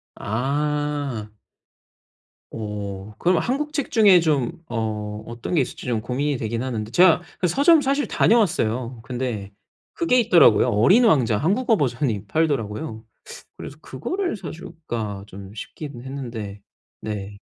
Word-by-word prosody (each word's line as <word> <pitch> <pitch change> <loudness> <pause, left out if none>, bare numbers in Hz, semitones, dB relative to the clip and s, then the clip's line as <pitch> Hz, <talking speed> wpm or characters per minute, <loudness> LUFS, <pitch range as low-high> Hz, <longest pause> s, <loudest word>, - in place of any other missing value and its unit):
아. 145 0 -2 1.2
오 105 -2 -6
그럼 180 +1 +3
한국 295 +4 -2
책 285 -5 -2
중에 205 -6 +6
좀 160 +2 0
어 105 -2 -3
어떤 120 +7 -6
게 150 - +4
있을지 130 - -5
좀 115 -3 0
고민이 135 +4 -1
되긴 115 +1 -3
하는데. 110 -5 -3
제가 180 +3 +5 0.2
그 180 - +2
서점 290 - +5
사실 280 +2 0
다녀왔어요. 125 - +1
근데 115 -5 -4 0.4
그게 255 -7 +2
있더라고요. 175 - +5
어린 185 - +5
왕자 120 - +3
한국어 215 - +2
버전이 120 - -1
팔더라고요. 115 -4 -1 0.5
그래서 145 - -9
'그거를 355 - -3
사줄까?' 120 - -6
좀 100 0 -10
싶긴 140 +3 -8
했는데. 115 -7 -6 0.4
네. 100 -2 -5
130 Hz, 265 characters per minute, -23 LUFS, 110-170 Hz, 1.2 s, 중에